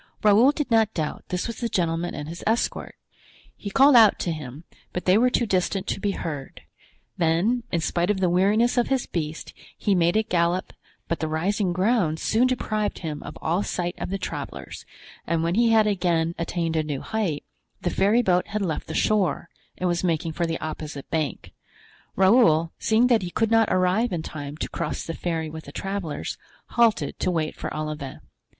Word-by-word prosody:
Raoul 215 Hz, +6 st, +6 dB
did 295 Hz, -3 st, -3 dB
not 220 Hz, -1 st, +3 dB
doubt 155 Hz, -3 st, -3 dB
this 180 Hz, 0 st, -2 dB
was 230 Hz, -, -5 dB
the 235 Hz, -, -2 dB
gentleman 170 Hz, -3 st, -1 dB
and 150 Hz, +1 st, -5 dB
his 170 Hz, +2 st, -8 dB
escort; 225 Hz, +2 st, -1 dB, 0.6 s
he 200 Hz, -, -6 dB
called 275 Hz, +5 st, +6 dB
out 220 Hz, -4 st, +7 dB
to 175 Hz, -, -1 dB
him, 150 Hz, -1 st, -7 dB, 0.3 s
but 180 Hz, -, -4 dB
they 185 Hz, -, +5 dB
were 245 Hz, +4 st, +4 dB
too 245 Hz, -, +1 dB
distant 190 Hz, -1 st, 0 dB
to -, -, -2 dB
be 200 Hz, 0 st, -1 dB
heard; 145 Hz, -7 st, -6 dB, 0.6 s
then, 175 Hz, +9 st, +2 dB
in 170 Hz, -, 0 dB
spite 175 Hz, +3 st, 0 dB
of 205 Hz, -2 st, +1 dB
the 185 Hz, -, +2 dB
weariness 205 Hz, +8 st, +3 dB
of 240 Hz, -, +1 dB
his 265 Hz, -2 st, 0 dB
beast, 155 Hz, -2 st, -4 dB, 0.2 s
he 205 Hz, -, +1 dB
made 175 Hz, +1 st, +3 dB
it 220 Hz, 0 st, +1 dB
gallop 175 Hz, -1 st, 0 dB, 0.3 s
but 170 Hz, -, -2 dB
the 160 Hz, -, -1 dB
rising 180 Hz, +5 st, 0 dB
ground 185 Hz, -4 st, +1 dB
soon 235 Hz, +4 st, +2 dB
deprived 215 Hz, -4 st, -1 dB
him 150 Hz, -2 st, -4 dB
of -, -, -9 dB
all 170 Hz, +4 st, +1 dB
sight 175 Hz, -3 st, -2 dB
of -, -, -4 dB
the 195 Hz, -, -2 dB
travelers, 185 Hz, -, -6 dB, 0.4 s
and 165 Hz, 0 st, 0 dB
when 170 Hz, +1 st, 0 dB
he 230 Hz, +3 st, +3 dB
had 220 Hz, -1 st, +5 dB
again 175 Hz, -5 st, +1 dB
attained 170 Hz, -1 st, -2 dB
a 160 Hz, -, +2 dB
new 150 Hz, -3 st, -4 dB
height, 200 Hz, -10 st, -2 dB, 0.4 s
the 175 Hz, -, 0 dB
ferryboat 195 Hz, -3 st, +2 dB
had 210 Hz, -1 st, -2 dB
left 160 Hz, -5 st, -3 dB
the 160 Hz, -, -5 dB
shore 185 Hz, -6 st, +1 dB, 0.3 s
and 180 Hz, -, -1 dB
was 175 Hz, 0 st, 0 dB
making 165 Hz, -2 st, 0 dB
for 170 Hz, +1 st, -1 dB
the 165 Hz, 0 st, -2 dB
opposite 155 Hz, -2 st, -6 dB
bank. 155 Hz, -3 st, -2 dB, 0.6 s
Raoul, 185 Hz, -5 st, +4 dB
seeing 225 Hz, +2 st, +3 dB
that 240 Hz, -4 st, +4 dB
he 180 Hz, -, -4 dB
could 225 Hz, +5 st, 0 dB
not 225 Hz, -1 st, +4 dB
arrive 185 Hz, +6 st, +2 dB
in 170 Hz, -3 st, -2 dB
time 145 Hz, -1 st, -7 dB
to -, -, -3 dB
cross 170 Hz, -3 st, -3 dB
the 165 Hz, -, -4 dB
ferry 160 Hz, -2 st, -3 dB
with 160 Hz, 0 st, -8 dB
the 140 Hz, -, -10 dB
travelers, 195 Hz, -2 st, -4 dB, 0.3 s
halted 225 Hz, -12 st, +2 dB
to -, -, 0 dB
wait 160 Hz, -3 st, -1 dB
for -, -, -5 dB
Olivain. 150 Hz, -3 st, -5 dB
180 Hz, 195 wpm, -24 LUFS, 160-215 Hz, 0.6 s, out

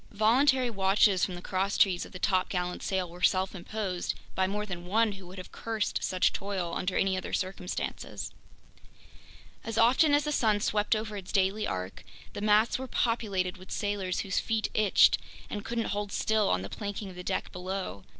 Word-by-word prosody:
Voluntary 250 Hz, +4 st, +4 dB
watches 195 Hz, -1 st, +3 dB
from 185 Hz, -, 0 dB
the 175 Hz, -, -9 dB
crosstrees 190 Hz, -1 st, +1 dB
of -, -, -17 dB
the -, -, -7 dB
topgallant 180 Hz, -1 st, 0 dB
sail 190 Hz, -2 st, -1 dB
were 175 Hz, +1 st, -12 dB
self 185 Hz, +1 st, +2 dB
imposed 190 Hz, -1 st, -3 dB, 0.2 s
by 190 Hz, 0 st, +1 dB
more 210 Hz, +2 st, -2 dB
than 175 Hz, -3 st, -6 dB
one 220 Hz, +3 st, +3 dB
who 195 Hz, -2 st, -10 dB
would 185 Hz, +2 st, -11 dB
have 185 Hz, -, -9 dB
cursed 225 Hz, -2 st, -2 dB
such 185 Hz, -1 st, +2 dB
toil 190 Hz, -4 st, -3 dB
under 180 Hz, +2 st, -1 dB
any 190 Hz, -1 st, +2 dB
other 185 Hz, -, -5 dB
circumstances. 185 Hz, -1 st, -3 dB, 1.3 s
As 225 Hz, -1 st, -4 dB
often 265 Hz, +6 st, +5 dB
as 290 Hz, -, +2 dB
the 300 Hz, -, -1 dB
sun 220 Hz, -7 st, +2 dB
swept 210 Hz, +1 st, +1 dB
over 215 Hz, -1 st, -4 dB
its 190 Hz, -2 st, -7 dB
daily 195 Hz, +2 st, +1 dB
arc, 95 Hz, 0 st, -5 dB, 0.3 s
the -, -, -5 dB
masts 215 Hz, +3 st, +3 dB
were 260 Hz, -, -5 dB
populated 205 Hz, -7 st, 0 dB
with 185 Hz, +1 st, -14 dB
sailors 200 Hz, -3 st, -1 dB
whose 190 Hz, -2 st, 0 dB
feet 225 Hz, -1 st, -1 dB
itched 210 Hz, -3 st, +5 dB, 0.3 s
and 205 Hz, -, -4 dB
couldn't 230 Hz, 0 st, -2 dB
hold 205 Hz, 0 st, -3 dB
still 215 Hz, 0 st, +1 dB
on 90 Hz, 0 st, +1 dB
the -, -, -4 dB
planking 205 Hz, -1 st, -5 dB
of -, -, -12 dB
the 180 Hz, -, -7 dB
deck -, -, -2 dB
below! 180 Hz, -, -5 dB
195 Hz, 185 wpm, -29 LUFS, 185-215 Hz, 1.3 s, often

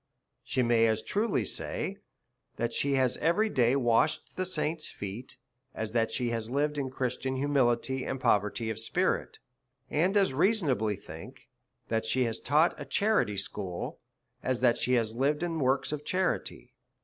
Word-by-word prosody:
She 130 Hz, -, 0 dB
may 115 Hz, -1 st, +4 dB
as 110 Hz, 0 st, 0 dB
truly 205 Hz, -, 0 dB
say^ -, -, -4 dB, 0.6 s
that 115 Hz, 0 st, -2 dB
she 140 Hz, +3 st, 0 dB
has 130 Hz, -2 st, +2 dB
every 210 Hz, +7 st, +2 dB
(lay 125 Hz, 0 st, +3 dB
washed 130 Hz, +4 st, +1 dB
the 185 Hz, 0 st, -1 dB
saints' 155 Hz, -2 st, -1 dB
feet, 105 Hz, +5 st, -6 dB, 0.4 s
as 110 Hz, -1 st, -3 dB
that 115 Hz, -1 st, +1 dB
she 120 Hz, -2 st, -1 dB
has 115 Hz, -1 st, -3 dB
lived 145 Hz, +3 st, 0 dB
in 135 Hz, -2 st, -2 dB
Christian 130 Hz, 0 st, -2 dB
humility 130 Hz, -2 st, +1 dB
and 135 Hz, -, -3 dB
poverty 105 Hz, +1 st, +1 dB
of 110 Hz, -, -4 dB
spirit, 115 Hz, 0 st, -1 dB, 0.5 s
and 180 Hz, +7 st, +2 dB
as 195 Hz, -8 st, +3 dB
rea 190 Hz, +11 st, +4 dB
sonably 125 Hz, -, 0 dB
think -, -, -11 dB, 0.4 s
that 110 Hz, 0 st, 0 dB
she 130 Hz, +3 st, +2 dB
has 115 Hz, -2 st, -2 dB
taught 150 Hz, +5 st, +3 dB
a -, -, -5 dB
charity 205 Hz, -, +1 dB
school, 95 Hz, -2 st, -4 dB, 0.4 s
as 130 Hz, -2 st, -1 dB
that 120 Hz, -2 st, +4 dB
she 125 Hz, -, +1 dB
has 115 Hz, -3 st, +2 dB
lived 145 Hz, +6 st, +1 dB
in 165 Hz, -2 st, -1 dB
works 135 Hz, +1 st, +1 dB
of 150 Hz, -1 st, -4 dB
charity. 185 Hz, +4 st, -2 dB
130 Hz, 165 wpm, -29 LUFS, 115-150 Hz, 0.6 s, may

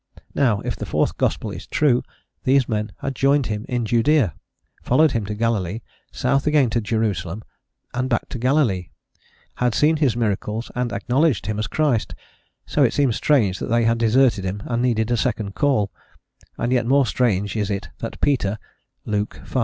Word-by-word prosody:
Now 115 Hz, -8 st, +2 dB
if -, -, -3 dB
the -, -, -6 dB
fourth -, -, 0 dB
gospel -, -, 0 dB
is -, -, -8 dB
true, 135 Hz, -5 st, +2 dB, 0.4 s
these 135 Hz, -1 st, +3 dB
men 105 Hz, -1 st, -2 dB
had 135 Hz, -, -2 dB
joined 140 Hz, +1 st, +2 dB
him 105 Hz, -1 st, -4 dB
in 120 Hz, -2 st, -1 dB
Judaea, 120 Hz, -, +2 dB, 0.5 s
followed 155 Hz, +4 st, +3 dB
him 110 Hz, -5 st, -2 dB
to 105 Hz, -, -3 dB
Galilee, 110 Hz, -2 st, -1 dB, 0.3 s
south 140 Hz, +2 st, 0 dB
again 145 Hz, -6 st, +3 dB
to 115 Hz, -, +1 dB
Jerusalem, 105 Hz, -3 st, -2 dB, 0.5 s
and 130 Hz, +1 st, -1 dB
back 120 Hz, -, 0 dB
to 125 Hz, -, -5 dB
Galilee, 120 Hz, -, +1 dB, 0.7 s
had 125 Hz, -3 st, +1 dB
seen 155 Hz, +6 st, +3 dB
his 135 Hz, -6 st, +1 dB
miracles 110 Hz, 0 st, -2 dB
and 125 Hz, -1 st, -2 dB
acknowledged 135 Hz, -, +1 dB
him 110 Hz, 0 st, -2 dB
as 110 Hz, -, -1 dB
Christ, 135 Hz, -2 st, 0 dB, 0.5 s
so -, -, 0 dB
it -, -, +4 dB
seems 135 Hz, -6 st, +2 dB
strange 110 Hz, -11 st, +2 dB
that -, -, -4 dB
they 120 Hz, 0 st, +3 dB
had 115 Hz, 0 st, +2 dB
deserted 115 Hz, -2 st, +3 dB
him 95 Hz, +2 st, -4 dB
and 120 Hz, -1 st, -1 dB
needed 115 Hz, -2 st, +1 dB
a 120 Hz, -, +2 dB
second 105 Hz, -2 st, -1 dB
call, 120 Hz, -8 st, +1 dB, 0.7 s
and 120 Hz, +1 st, -1 dB
yet 120 Hz, -2 st, +1 dB
more 140 Hz, +1 st, +4 dB
strange 105 Hz, -4 st, 0 dB
is 105 Hz, -2 st, -1 dB
it 100 Hz, +1 st, -3 dB
that 115 Hz, -, -6 dB
Peter 110 Hz, -8 st, +1 dB, 0.5 s
(Luke 105 Hz, 0 st, -2 dB
v. 130 Hz, -, -2 dB
115 Hz, 180 wpm, -22 LUFS, 105-130 Hz, 0.7 s, it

